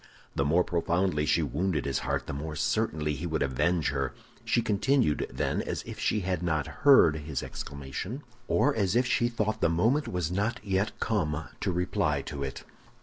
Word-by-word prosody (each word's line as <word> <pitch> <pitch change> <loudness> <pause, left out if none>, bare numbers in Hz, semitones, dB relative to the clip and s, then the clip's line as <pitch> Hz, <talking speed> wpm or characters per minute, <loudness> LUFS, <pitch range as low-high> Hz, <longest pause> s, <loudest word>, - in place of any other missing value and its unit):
The 70 - +2
more 80 +6 +3
profoundly 85 -2 0
she 80 +3 +3
wounded 75 +3 -1
his 70 -2 0
heart, - - -2
the - - -5
more 75 +2 -4
certainly 75 0 0
he 80 +5 -4
would 80 -1 0
avenge 80 +5 +1
her. 70 -2 -2 0.3
She 120 - +1
continued, 110 - +2
then, - - -1
as - - -4
if - - -8
she 105 - +1
had 90 -2 -1
not 80 -5 0 0.2
heard 135 - +7
his 75 -2 -4
exclamation, 70 - -6 0.2
or 145 - +3
as 100 -4 0
if 125 +1 +4
she 120 -1 +2
thought 110 -2 -1
the - - +4
moment 115 - +2
was 90 -2 -2
not 105 +6 0
yet 95 +1 -1
come 80 -8 -1
to 95 - 0
reply 90 -5 0
to 70 -3 -6
it. 70 -1 -4
85 Hz, 185 wpm, -29 LUFS, 75-105 Hz, 0.3 s, heard